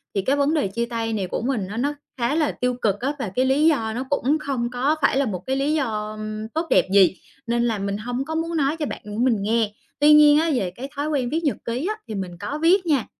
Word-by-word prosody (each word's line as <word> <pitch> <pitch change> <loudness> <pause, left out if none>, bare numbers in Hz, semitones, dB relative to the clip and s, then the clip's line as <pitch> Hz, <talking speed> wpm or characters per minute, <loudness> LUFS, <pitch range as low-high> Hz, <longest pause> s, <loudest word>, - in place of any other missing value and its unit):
thì 195 - +2
cái 265 +9 +1
vấn 285 +1 +2
đề 300 -9 +1
chia 235 +5 -2
tay 230 -1 -3
này 200 -4 -2
của - - -3
mình 230 -6 -1
nó 210 +3 -6
nó 285 +5 0 0.2
khá 240 +3 0
là 310 -2 +1
tiêu 250 0 -1
cực 205 -2 +1
á. 270 +4 -1
Và 215 -7 -3
cái 255 - +2
lý 270 +4 +3
do 225 -9 +1
nó 245 +3 -3
cũng 285 +1 +1
không 265 -5 -2
có 255 +5 +1
phải 270 - +3
là 280 - +2
một 195 -6 -3
cái 265 - 0
lý 275 +3 0
do, 220 -8 -1
ưm, 215 0 -5
tốt 320 +5 -2
đẹp - - +4
gì, 190 -2 +6 0.3
nên 235 0 +1
là 230 -3 0
mình 200 0 -2
hông 245 +5 -3
có 320 +2 -4
muốn 330 +1 -1
nói 290 +1 +1
cho 310 - -2
bạn - - -6
của 210 0 -7
mình 250 -4 +3
nghe. 220 +1 +1 0.3
Tuy 295 +1 +7
nhiên 300 -1 +7
á, 330 +1 +1
về 195 -9 -1
cái 265 +3 -7
thói 285 +1 -2
quen 270 -5 0
viết 320 +5 -1
nhật 290 - 0
ký 245 +6 -2
á, 430 - -1
thì 215 - -5
mình 185 -3 -5
có 290 - -4
viết 360 +3 +4
nha. 290 -8 +1
250 Hz, 280 wpm, -23 LUFS, 220-295 Hz, 0.3 s, Tuy